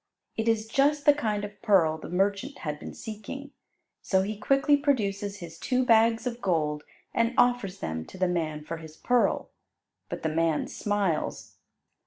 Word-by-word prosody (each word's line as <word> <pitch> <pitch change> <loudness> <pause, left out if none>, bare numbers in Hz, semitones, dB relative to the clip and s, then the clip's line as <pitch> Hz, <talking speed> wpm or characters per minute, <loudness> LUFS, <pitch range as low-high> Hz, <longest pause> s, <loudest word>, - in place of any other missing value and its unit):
It 225 0 -2
is 225 -1 +2
just 285 +5 +2
the 290 - +8
kind 215 -7 -1
of 205 0 -11
pearl 165 -7 +3
the - - -8
merchant 200 +9 0
had 150 -1 -3
been - - -8
seeking, 245 +5 -7 0.5
so 190 -1 +2
he 210 +2 -3
quickly 275 +7 +3
produces 205 -8 0
his 165 -1 -9
two 255 0 +1
bags 225 0 +4
of 245 -1 -3
gold 150 -6 0 0.3
and 230 +1 +1
offers 245 -6 +2
them 80 0 -3
to - - -12
the 185 0 +2
man 155 -4 -2
for 165 +2 -5
his 160 -1 -11
pearl. 245 -1 +1 0.6
But - - -5
the 160 - +1
man 160 -1 +1
smiles. 205 -6 -2
205 Hz, 170 wpm, -28 LUFS, 165-245 Hz, 0.6 s, the